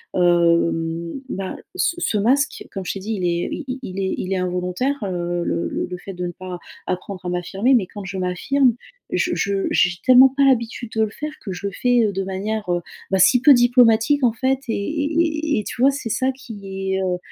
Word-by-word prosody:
hem, 170 Hz, -1 st, +2 dB, 0.2 s
bah, 195 Hz, -5 st, -4 dB, 0.2 s
ce 355 Hz, -2 st, +1 dB
ce 215 Hz, -, 0 dB
masque 265 Hz, +8 st, +1 dB
comme 190 Hz, -1 st, -6 dB
je -, -, -2 dB
t'ai 195 Hz, -, -6 dB
dit, 215 Hz, +4 st, -4 dB
il 190 Hz, -, -4 dB
est 170 Hz, 0 st, 0 dB
i 265 Hz, -4 st, -5 dB
il 190 Hz, -4 st, -5 dB
est 190 Hz, -1 st, -1 dB
il 190 Hz, +1 st, -3 dB
est 190 Hz, -, 0 dB
involontaire, 180 Hz, +9 st, -1 dB
heu, 175 Hz, -2 st, -2 dB
le 85 Hz, 0 st, -1 dB, 0.2 s
le 180 Hz, -, -5 dB
fait 195 Hz, +2 st, -9 dB
de 180 Hz, 0 st, -4 dB
ne 175 Hz, -, -4 dB
pas 185 Hz, 0 st, -7 dB, 0.3 s
apprendre 185 Hz, +1 st, -4 dB
à 180 Hz, -, -3 dB
m'affirmer 195 Hz, +8 st, +1 dB
mais 220 Hz, -6 st, +2 dB
quand 205 Hz, 0 st, -9 dB
je 195 Hz, 0 st, -5 dB
m'affirme 235 Hz, +9 st, +1 dB, 0.4 s
je 355 Hz, -, 0 dB
je 200 Hz, -1 st, 0 dB
j'ai 180 Hz, 0 st, +2 dB
tellement 255 Hz, +1 st, +7 dB
pas 280 Hz, -, +3 dB
l'habitude 235 Hz, -3 st, +1 dB
de 220 Hz, -, +3 dB
le 215 Hz, -, -1 dB
faire 300 Hz, +5 st, -5 dB
que 195 Hz, -, -6 dB
je 185 Hz, +2 st, -4 dB
le 195 Hz, -, -6 dB
fais, 245 Hz, -1 st, +3 dB
heu, 205 Hz, -, 0 dB
de 195 Hz, 0 st, -2 dB
manière, 200 Hz, +2 st, -3 dB
heu, 175 Hz, -, -1 dB, 0.3 s
bah, 190 Hz, -, +2 dB
si 235 Hz, +7 st, +5 dB
peu 285 Hz, +2 st, +8 dB
diplomatique 245 Hz, +2 st, +4 dB
en 235 Hz, -3 st, +4 dB
fait, 260 Hz, +3 st, +1 dB
et -, -, 0 dB
et 310 Hz, +3 st, 0 dB
et -, -, -3 dB
tu -, -, -5 dB
vois, 275 Hz, -, +6 dB
c'est 270 Hz, -4 st, -5 dB
ça 260 Hz, +4 st, +1 dB
qui 195 Hz, -7 st, -6 dB
est, 190 Hz, -, 0 dB
heu, 180 Hz, -1 st, 0 dB
200 Hz, 220 wpm, -21 LUFS, 180-255 Hz, 0.4 s, peu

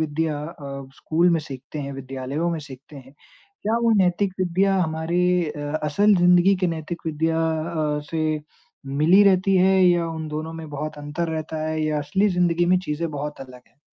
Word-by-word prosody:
विद्या 155 Hz, 0 st, -1 dB
अ, 140 Hz, -4 st, -8 dB
school 170 Hz, +3 st, +1 dB
में 165 Hz, -1 st, +2 dB
सीखते 140 Hz, 0 st, -9 dB
हैं, 140 Hz, -1 st, -4 dB
विद्यालयों 135 Hz, +4 st, -4 dB
में 165 Hz, -, -2 dB
सीखते 140 Hz, 0 st, -12 dB
हैं, 135 Hz, 0 st, -13 dB, 0.5 s
क्या 220 Hz, +2 st, +1 dB
वो 230 Hz, -, +3 dB
नैतिक 185 Hz, +2 st, +1 dB
विद्या 185 Hz, +2 st, +2 dB
हमारी 160 Hz, +2 st, -1 dB, 0.3 s
अ, 145 Hz, -1 st, -5 dB
असल 200 Hz, +8 st, +3 dB
ज़िंदगी 180 Hz, +2 st, +5 dB
के 185 Hz, -, +2 dB
नैतिक 165 Hz, 0 st, -5 dB
विद्या 160 Hz, +1 st, 0 dB, 0.6 s
अ, -, -, -4 dB
से 155 Hz, -1 st, -1 dB, 0.5 s
मिली 155 Hz, +8 st, +4 dB
रहती 195 Hz, 0 st, +4 dB
है 190 Hz, +1 st, +4 dB
या 175 Hz, -1 st, +3 dB
उन 160 Hz, -1 st, -5 dB
दोनों 155 Hz, +2 st, -5 dB
में 165 Hz, -1 st, -8 dB
बहुत 150 Hz, +1 st, -5 dB
अंतर 145 Hz, +3 st, -3 dB
रहता 160 Hz, 0 st, -4 dB
है 155 Hz, 0 st, -2 dB
या 155 Hz, -1 st, 0 dB
असली 190 Hz, +8 st, +1 dB
ज़िंदगी 175 Hz, -1 st, +2 dB
में 180 Hz, +1 st, +4 dB
चीज़ें 160 Hz, +2 st, -2 dB
बहुत 150 Hz, 0 st, -5 dB
अलग 130 Hz, -2 st, -11 dB
हैं? -, -, -37 dB
160 Hz, 180 wpm, -23 LUFS, 150-175 Hz, 0.6 s, ज़िंदगी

